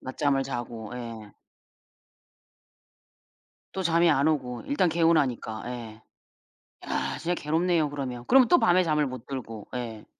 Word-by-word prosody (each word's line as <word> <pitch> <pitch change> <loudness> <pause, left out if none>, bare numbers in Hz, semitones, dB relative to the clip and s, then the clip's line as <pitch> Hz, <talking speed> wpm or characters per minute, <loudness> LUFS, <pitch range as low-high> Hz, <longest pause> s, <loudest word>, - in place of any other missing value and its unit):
낮잠을 135 +1 0
자고. 120 -4 -5
예. 115 -4 -8 2.4
또 190 - -2
잠이 170 0 +3
안 145 +1 +3
오고 125 -6 -2
일단 280 -10 +2
개운하니까. 155 -9 +1
예. 115 -3 -7 0.9
야 - - -2
진짜 175 +1 -1
괴롭네요, 160 0 +1
그러면. 130 -4 -5
그러면 260 -2 +6
또 350 - +6
밤에 180 +1 +4
잠을 150 -2 +1
못 130 -1 -8
들고 115 -6 -7
예. 115 -3 -5
135 Hz, 245 characters per minute, -27 LUFS, 120-165 Hz, 2.4 s, 그러면